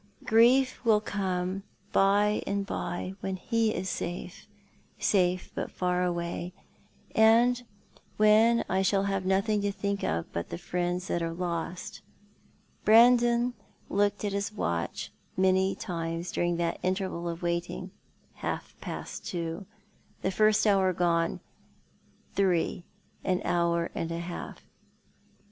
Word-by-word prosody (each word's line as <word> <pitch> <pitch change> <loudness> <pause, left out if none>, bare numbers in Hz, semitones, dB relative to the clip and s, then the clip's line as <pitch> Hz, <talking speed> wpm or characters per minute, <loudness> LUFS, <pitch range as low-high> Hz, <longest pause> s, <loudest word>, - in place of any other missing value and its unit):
Grief 250 +4 +4
will 220 -3 +5
come 190 -2 -2 0.3
by 205 +2 +3
and 200 0 -1
by 185 0 -4
when 190 0 -3
he 225 +3 0
is 190 - -3
safe 175 0 -5 0.3
— - - -33 0.2
safe, 180 -2 +1
but - - -3
far 180 0 0
away 175 0 -2 0.3
— - - -34
and 235 +3 +5 0.6
when 220 +2 +5
I 190 +1 +1
shall 195 0 +2
have 195 -2 -1
nothing 200 +2 +2
to 200 0 0
think 200 0 -2
of 80 +1 0
but 85 - -3
the - - -4
friends 180 +1 -2
that 170 - -1
are 165 0 -2
lost." 170 0 -4 0.8
Brandon 240 +2 +5 0.4
looked 205 0 +1
at 200 - -1
his 200 +2 -1
watch 85 - -3 0.3
many 190 0 +3
times 165 -2 -4
during 175 0 0
that 170 -1 -1
interval 185 -2 -2
of 170 +1 -6
waiting. 175 +2 -2 0.5
Half - - -4
past - - -6
two 170 +2 -4 0.3
— - - -35
the 190 - +1
first 215 +2 +3
hour 195 -3 +4
gone 170 -1 +1 0.4
— - - -35
three, 180 -3 +1 0.4
an 185 -1 +1
hour 170 -1 +1
and 165 - -3
a 165 - -2
half. 170 +1 -6
190 Hz, 135 wpm, -29 LUFS, 175-210 Hz, 0.8 s, will